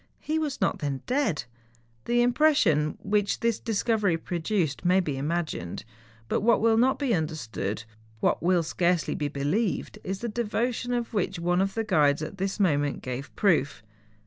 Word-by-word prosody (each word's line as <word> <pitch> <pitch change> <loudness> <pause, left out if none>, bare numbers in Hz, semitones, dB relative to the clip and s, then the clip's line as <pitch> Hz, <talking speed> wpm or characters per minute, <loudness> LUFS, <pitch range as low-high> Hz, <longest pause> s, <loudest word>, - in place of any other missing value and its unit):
He 315 +1 -1
was 300 -3 -2
not - - 0
then 140 -3 -3
dead! 250 - 0 0.6
The 240 0 +3
impression 240 - +3
which 205 0 0
this 230 -2 +1
discovery 215 -5 +1
produced 170 -2 -2
may 180 +1 +4
be 155 -7 -1
imagined. 150 - -3 0.4
But - - 0
what 230 +1 +4
will 225 0 +4
not 250 +4 +3
be 275 -5 0
understood, 115 - -3 0.4
what - - +1
will 175 0 +3
scarcely 170 -1 +1
be 145 -1 -2
be¬ 140 0 -4
lieved, 205 +6 -1
is 190 +1 -4
the 240 - -2
devotion 235 +2 -1
of 240 -2 -2
which 200 -5 -1
one 175 +2 +1
of 195 0 -1
the 225 - 0
guides 150 -7 +2
at 190 +5 -7
this 195 +2 -2
moment 145 -7 +1
gave 130 +2 -5
proof. 145 - +1
185 Hz, 170 wpm, -27 LUFS, 150-230 Hz, 0.6 s, may